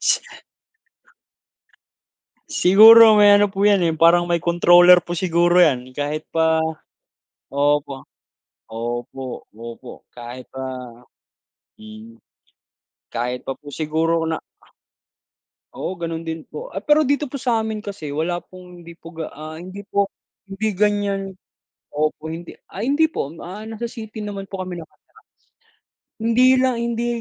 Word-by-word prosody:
Si - - +2 2.3
Siguro 220 +4 +8
may 205 -1 +7
ano 205 - +3
po 195 +1 -2
yan, 205 -2 +4
eh, 170 - +2
yung 160 - -2
parang 170 +2 +4
may 170 - +2
controller 175 +1 +6
po 175 0 -6
siguro 175 0 +3
yan, 130 -5 0
kahit 150 +2 -4
pa 160 0 +1 0.9
opo. 140 0 -1 0.7
Opo, 120 +3 -6
opo, 115 +3 -11
kahit 120 +1 -9
pa 130 0 -8 1.2
mm. 220 +2 -13 0.9
Kahit 125 +2 -4
pa 135 - -3
po 145 +2 -13
siguro 160 +2 -1
na 160 0 -3 1.3
Oo, 185 - -5
gano'n 165 -1 -5
din 160 -1 -5
po. - - -9
Ay - - -4
pero 300 +1 +4
dito 285 +2 +1
po 275 - -6
sa'min 220 -3 -1
kasi 195 -8 -7
wala 170 +4 -2
pong 180 -1 -14
hindi 170 - -11
po - - -19
ga 160 -1 -4
ah, 155 +2 -9
hindi 185 +4 -9
po 200 -1 0 0.3
hindi 200 +2 -3
ganyan 200 -1 0 0.6
opo, 155 +1 -2
hindi 165 +2 -8 0.2
ah, 200 - -6
hindi 300 +4 +2
po. 150 - -5
Ah, 200 +5 -8
nasa 225 +1 -6
city 220 -1 -9
naman 200 -2 -6
po 195 -1 -6
kami 180 -1 -6
nakatira. 160 - -16 1.1
Hindi 230 +3 +3
lang 255 -1 +1
hindi 235 0 -2
175 Hz, 135 wpm, -21 LUFS, 155-210 Hz, 2.3 s, Siguro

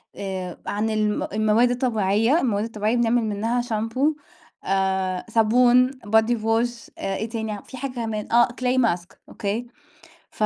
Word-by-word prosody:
آآ 190 -3 -5
عن 215 +2 -1
الم 215 -1 0
المواد 215 +3 +3
الطبيعية، 225 - +2
المواد 215 -7 0
الطبيعية 220 0 -1
بنعمل 235 0 +2
منها 220 +3 -1
شامبو، 240 +6 0 1.1
الصابون، 245 +3 +4
body 220 -2 +1
wash 230 +1 -1
آآ، 195 - -3
إيه 220 +4 -4
تاني 220 -2 -4
في 260 - -10
حاجة 275 0 -4
كمان 225 -3 -4
آه، 240 0 +5
clay 250 +1 -1
mask 180 -7 0
أوكي؟ 215 +4 -3 0.6
ف - - -4
225 Hz, 140 wpm, -23 LUFS, 210-245 Hz, 1.1 s, آه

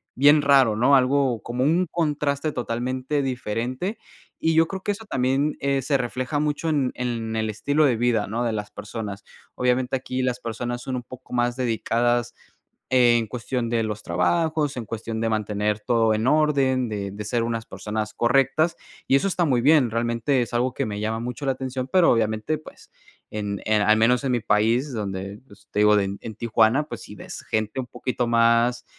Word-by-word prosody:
bien 145 +3 +6
raro, 135 -6 +4
¿no? 130 +5 +5
Algo 130 -2 +2
como 125 +2 -2
un 175 +5 +2
contraste 150 -2 -1
totalmente 130 +3 -2
diferente. 130 - -3 0.4
Y 160 - +1
yo 165 0 +5
creo 190 +1 -6
que - - 0
eso 220 +2 -10
también, 135 -1 0
eh, 140 -1 +1
se 140 +2 +1
refleja 130 +3 -2
mucho 150 +2 -1
en 140 -5 +1
en 115 -3 -3
el 110 0 -1
estilo 145 +8 +1
de 130 -4 +3
vida, 115 -2 +1
¿no?, 115 +4 -2
de 115 -2 0
las 105 -1 -4
personas. 105 -2 -6 0.3
Obviamente 125 +1 +1
aquí 130 0 -3
las 125 -1 -1
personas 120 +2 -4
son 130 +1 -4
un 125 - -5
poco 130 +1 -12
más 120 0 +1
dedicadas 120 0 0 0.6
en 120 -3 +4
cuestión 125 0 -3
de 115 -1 +1
los 105 -1 -4
trabajos, 150 - 0
en 120 - -4
cuestión 115 +1 -5
de 115 - 0
mantener 105 -1 -1
todo 115 0 +2
en 110 +3 0
orden, 135 -4 +2
de 100 -2 -4
de 105 +1 -7
ser 115 +2 0
unas 115 -1 -3
personas 105 0 -4
correctas 135 +7 +2 0.3
y - - +4
eso 140 +8 +2
está 180 -2 +1
muy 130 -6 +2
bien. 140 -2 +5
Realmente 115 +3 0
es 120 - -4
algo 125 +1 +1
que 135 - -2
me 105 -2 -4
llama 110 +1 -1
mucho 125 +4 -5
la 135 - +2
atención, 130 0 -4
pero 185 -2 +5
obviamente, 110 +6 0
pues 155 - -15 0.4
en, 100 -2 -4
eh, 110 - +2
al 110 +1 +4
menos 125 +4 +3
en 135 - 0
mi 120 - +2
país 115 +7 +1
donde, 100 -2 -4
pues 100 - -19
te - - -1
digo 105 0 +5
de 100 -1 -1
en 110 - -8
Tijuana, 115 +5 +2
pues - - -7
si 105 - -11
ves 95 - -9
gente 110 +3 -1
un 125 - -4
poquito 125 0 -3
más 115 +1 +3
120 Hz, 195 wpm, -24 LUFS, 110-135 Hz, 0.6 s, bien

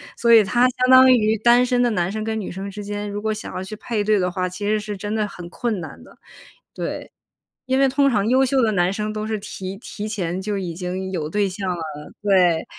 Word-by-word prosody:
所 235 -1 +2
以 225 -2 +8
他 240 +5 +3
相 255 0 +1
当 260 0 +8
于 220 -3 +3
单 240 +3 +4
身 245 -1 +1
的 240 - +3
男 180 -3 -1
生 215 0 -4
跟 220 0 -2
女 195 - -5
生 195 +2 -6
之 205 +1 -8
间， 205 0 -4
如 205 0 -4
果 220 +1 -1
想 215 - -7
要 185 - -3
去 190 +3 -7
配 215 -1 -2
对 210 -1 +2
的 180 - +1
话， 185 0 -2
其 195 +3 -5
实 215 0 +2
是 210 0 -5
真 205 +2 -4
的 215 -1 0
很 175 -3 -10
困 225 0 -2
难 160 - -9
的， - - -18 0.6
对。 - - -5 0.5
因 260 +1 +1
为 275 - +5
通 275 +1 +3
常 210 -3 +1
优 260 +2 +4
秀 265 0 +2
的 225 - +3
男 180 -1 +1
生 210 +1 -3
都 215 0 -4
是 220 - -1
提 190 -1 -7
提 215 -2 -7
前 185 -4 -3
就 205 +1 -3
已 185 -3 -3
经 185 +2 -4
有 160 -5 -3
对 205 +3 0
象 190 +1 -5
了， 175 -2 -2 0.4
对， 180 -5 +3
210 Hz, 270 characters per minute, -22 LUFS, 190-225 Hz, 0.6 s, 以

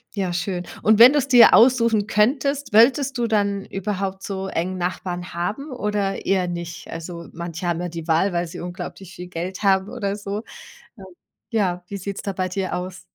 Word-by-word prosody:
Ja, 190 -3 -1
schön. 175 0 -2 0.2
Und 220 0 +4
wenn 245 +4 +10
du's 290 -3 +1
dir 245 -4 +7
aussuchen 230 -4 +5
könntest, 270 +5 +1
wolltest 265 +5 +4
du 235 - +1
dann 200 -2 0
überhaupt 195 0 -4
so 195 -1 -4
eng 185 0 -2
Nachbarn 175 0 -4
haben 215 - -3
oder 210 -5 -2
eher 190 -2 +1
nicht? 170 -1 -6
Also, 170 0 -7
manche 170 +1 -5
haben 170 0 -1
ja 180 - -3
die 165 -1 -7
Wahl, 170 +4 +2
weil 175 0 -1
sie 165 - -9
unglaublich 180 +1 -7
viel 180 - -8
Geld 180 +2 -5
haben 190 0 +3
oder 205 -5 -3
so. 205 +1 -5 0.6
Ähm, 190 - -10 0.4
ja, 185 -6 0
wie 200 - -5
sieht's 195 +1 -5
da 200 - -4
bei 185 0 -1
dir 190 0 -3
aus? 180 +1 -5
195 Hz, 185 wpm, -22 LUFS, 175-210 Hz, 0.6 s, wenn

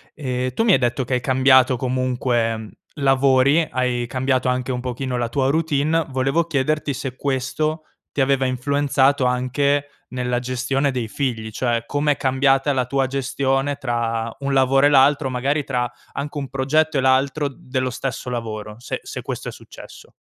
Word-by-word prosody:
Ehm, 130 -3 -3
tu - - +2
mi 225 - +4
hai - - +5
detto 120 +1 0
che 130 - -3
hai 125 - -1
cambiato 130 0 +4
comunque 120 -4 -1 0.2
lavori, 135 +2 +3
hai 125 -2 -1
cambiato 130 0 0
anche 125 +1 -1
un 125 0 -3
pochino 125 +1 -3
la 120 -1 -1
tua 135 +2 +1
routine. 160 +1 +1
Volevo 135 +5 +1
chiederti 150 -1 0
se 130 -1 -5
questo 140 +4 -2 0.3
ti 140 - -1
aveva 135 0 +2
influenzato 140 +1 +1
anche 140 +3 +1 0.2
nella 125 -1 -1
gestione 130 +3 -1
dei 125 -3 -3
figli, 115 -4 -3
cioè 120 0 -1
com'è 145 +1 0
cambiata 135 +1 +2
la 130 -2 0
tua 135 +1 0
gestione 135 +1 -1
tra 115 -3 -2
un 140 0 -2
lavoro 135 +1 +4
e - - +4
l'altro, 140 0 +4
magari 135 +4 0
tra 125 -3 -1 0.2
anche 145 +2 -5
un 140 -3 -5
progetto 145 +3 +1
e - - +2
l'altro 135 +3 +2
dello 130 -1 -3
stesso 125 0 -4
lavoro? 110 -3 -5
Se 120 - -5
se - - -6
questo - - -5
è - - -6
successo. - - -13
130 Hz, 165 wpm, -21 LUFS, 125-140 Hz, 0.3 s, hai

